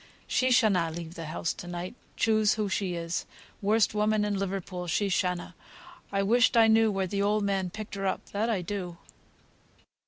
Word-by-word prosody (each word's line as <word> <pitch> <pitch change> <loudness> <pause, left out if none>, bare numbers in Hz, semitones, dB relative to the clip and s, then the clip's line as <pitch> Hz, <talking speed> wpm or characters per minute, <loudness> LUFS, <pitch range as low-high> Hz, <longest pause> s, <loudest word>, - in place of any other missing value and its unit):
She 255 - +1
shanna 205 -9 +3
leave 165 0 -7
the 165 -2 -7
house 160 +1 -2
to 175 - -9
night, 175 +2 -5 0.2
choose 215 -2 +3
who 215 -1 -1
she 190 -2 -1
is, 170 0 -3 0.3
worst 210 +1 +3
woman 210 0 +2
in 205 -1 -1
Liverpool, 190 -2 -3
she 195 +5 +1
shanna. 180 -1 -1 0.6
I 195 0 +1
wished 235 +3 +4
I 225 - +7
knew 220 0 +4
where 195 -1 0
th' 200 +2 -2
old 205 +1 +2
man 195 -2 0
picked 215 +3 -8
her 195 -1 -2
up, - - -2
that 215 +3 0
I 200 -6 0
do." 180 -2 -5
195 Hz, 185 wpm, -28 LUFS, 180-215 Hz, 0.6 s, I